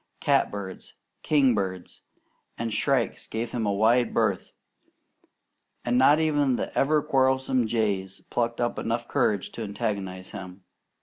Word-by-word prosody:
Catbirds, 100 -2 -1 0.3
king 140 -5 +3
birds, 95 -4 -4 0.6
and 115 -1 -3
shrikes 130 -5 0
gave 115 +2 -4
him 115 -3 -2
a - - +2
wide 115 +4 +2
berth, - - 0 1.3
and 120 0 +1
not 140 +4 +5
even 145 -4 +2
the - - -4
ever 150 +1 +2
quarrelsome 130 -3 +2
jays 100 -4 -1
plucked 115 -1 -1
up 120 0 -1
enough 115 +1 -2
courage 100 -3 0
to - - -7
antagonize 100 -3 -4
him. 95 0 -9
115 Hz, 130 wpm, -26 LUFS, 100-130 Hz, 1.3 s, not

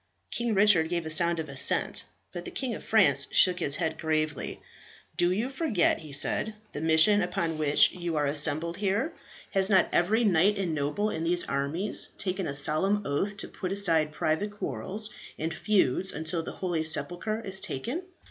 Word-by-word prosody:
King 235 -2 -1
Richard 195 -5 +4
gave 170 -2 -2
a 160 - -4
sound 170 +1 +3
of 160 - -4
assent, 135 -1 -1 0.3
but 175 - -6
the - - -7
King 260 -3 -3
of - - -7
France 140 - +4
shook 180 -1 +4
his 145 -4 -1
head 160 +1 -2
gravely. 155 -2 -2 0.6
"Do 175 0 +2
you 215 +7 0
forget," 270 - +1
he 155 -2 -11
said, 210 +9 -1 0.2
"the 150 - -5
mission 160 +6 +4
upon 170 -3 -2
which 150 -1 +4
you 175 -2 -4
are 145 - +1
assembled 150 +3 +1
here? 205 - -1 0.4
Has 195 -1 +2
not 190 -3 +4
every 215 +7 +2
knight 200 0 +3
and 185 -4 -1
noble 155 +9 -1
in 160 - -3
these 175 +1 +2
armies 145 +9 -1
taken 190 -1 -2
a 140 - -4
solemn 175 +8 +1
oath 195 +9 -2
to - - -4
put 185 - -5
aside 165 -6 +2
private 155 +6 -1
quarrels 205 - -4 0.3
and 160 +1 -3
feuds 190 -2 +1
until 160 +2 -3
the - - -7
holy 175 -4 -2
sepulchre 175 +8 -1
is 190 -3 -3
taken? 240 - -4
175 Hz, 180 wpm, -28 LUFS, 155-200 Hz, 0.6 s, Richard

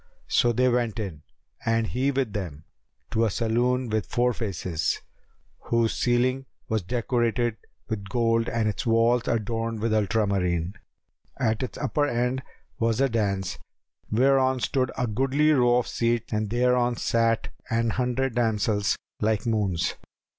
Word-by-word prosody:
So 120 - +3
they 125 +2 +2
went 120 -3 +1
in 90 -9 -5 0.4
(and 115 0 +1
he 130 +5 0
with 130 -6 -1
them) 85 -7 -5 0.5
to 115 - +2
a 115 - +3
saloon 120 +4 +1
with 110 -1 -1
four 125 0 +1
faces, 90 -7 -2 0.7
whose 115 -1 +2
ceiling 130 +2 +1 0.2
was 110 -1 0
decorated 120 +2 0 0.3
with 100 -3 -4
gold 115 +1 +1
and 115 -2 0
its 105 - -2
walls 115 0 +3
adorned 115 0 -1
with 110 +1 0
ultramarine.[FN#280] 95 -5 +1 0.7
At 110 -4 +1
its 130 - -4
upper 145 -1 0
end 125 +2 0 0.4
was 115 0 +1
a 135 0 +3
daпs, 100 -5 -1 0.5
whereon 130 +2 +3
stood 130 0 0
a 125 - +1
goodly 135 +7 +2
row 125 -4 +4
of 125 - +1
seats[FN#281] 115 -1 -1
and 105 -1 -1
thereon 125 +1 +2
sat 115 0 +1 0.2
an 115 0 +1
hundred 125 +1 0
damsels 110 -3 +1 0.2
like 110 -1 0
moons. 105 -7 0
115 Hz, 140 wpm, -26 LUFS, 110-125 Hz, 0.7 s, row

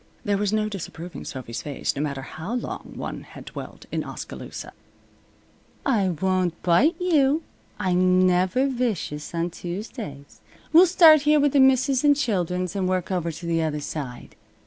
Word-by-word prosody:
There 205 -1 +2
was 205 -1 0
no 215 0 +1
disapproving 180 -4 -7
Sophy's 125 -3 -6
face, 145 0 -3
no 140 - -2
matter 140 -3 -3
how 160 - -5
long 245 - -5
one - - -5
had - - -12
dwelt - - -9
in - - -1
Oskaloosa. - - -8 1.1
"I 215 -9 +2
won't 180 0 0
bite 240 - +4
you," 315 -4 +2 0.3
said - - -4
Sophy. 185 - +2
"I'm 185 +1 +4
never 185 +8 +2
vicious 220 - -3
on 170 +1 -1
Tuesdays. 175 - -7 0.3
We'll 350 +3 +8
start 325 -4 +7
here 300 +1 +4
with 285 -1 +2
the 285 - +4
misses' 265 0 +4
an' 290 -1 +6
children's, 180 - -1
and 185 -2 0
work 185 0 -1
over 170 -2 -1
to 165 +2 -9
the 165 -1 +1
other 155 -2 -1
side." 140 -4 -6
185 Hz, 170 wpm, -24 LUFS, 170-260 Hz, 1.1 s, We'll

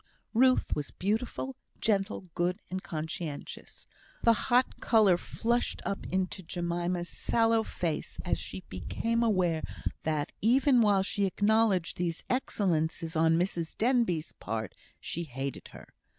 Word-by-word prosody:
Ruth 255 +2 +4
was 145 -1 -3
beautiful, 225 +6 -2 0.2
gentle, 205 -2 +1
good, 180 +1 0
and 185 0 -2
conscientious. 160 -2 -6 0.4
The 230 - +7 0.2
hot 250 +1 +3
colour 215 -6 +5
flushed 235 +7 -1
up 200 - -3
into 190 +1 -1
Jemima's 175 0 -2
sallow 225 +2 +2
face 170 -7 -3
as - - +1
she 95 0 -6
became 230 - -1
aware 185 -8 +2 0.4
that, 155 -2 -1
even 255 +3 +5
while 200 -3 +4
she 200 +1 0
acknowledged 205 -2 +2
these 170 -2 -2
excellences 165 -9 0
on 160 +1 +4
Mrs 170 -2 -1
Denbigh's 225 -10 +2
part, 110 -1 -3 0.3
she 170 +1 -4
hated 135 -1 -5
her. - - -13
185 Hz, 125 wpm, -30 LUFS, 165-225 Hz, 0.4 s, The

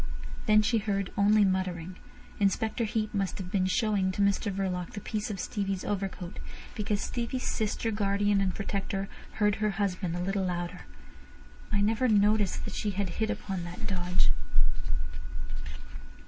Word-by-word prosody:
Then 215 0 +6
she 225 +2 +3
heard 200 -2 -1
only 205 +1 +5
muttering. 185 -2 -1 0.4
Inspector 215 +3 +2
Heat 215 0 -1
must 195 -2 0
have 185 -2 -6
been 185 -2 +2
showing 200 -2 +2
to 200 - -1
Mr 200 +1 +2
Verloc 185 -2 -2
the 205 - -4
piece 210 +1 -2
of 200 -3 -3
Stevie's 195 -1 -2
overcoat, 190 -3 -3 0.3
because 210 -1 -1
Stevie's 245 +1 -2
sister, 220 +1 0
guardian, 205 -1 +2
and 190 -2 +1
protector 195 -1 -2 0.2
heard 210 -1 +2
her 215 0 +2
husband 185 -4 0
a - - -2
little 195 +2 0
louder. 175 0 -3 0.8
"I 205 - +3
never 225 +5 +3
noticed 210 -2 +3
that - - -5
she 210 - -1
had 200 -2 +1
hit 220 - +2
upon 190 -3 -2
that 175 +1 -6
dodge." 180 -1 +2
200 Hz, 150 wpm, -30 LUFS, 185-210 Hz, 0.8 s, Then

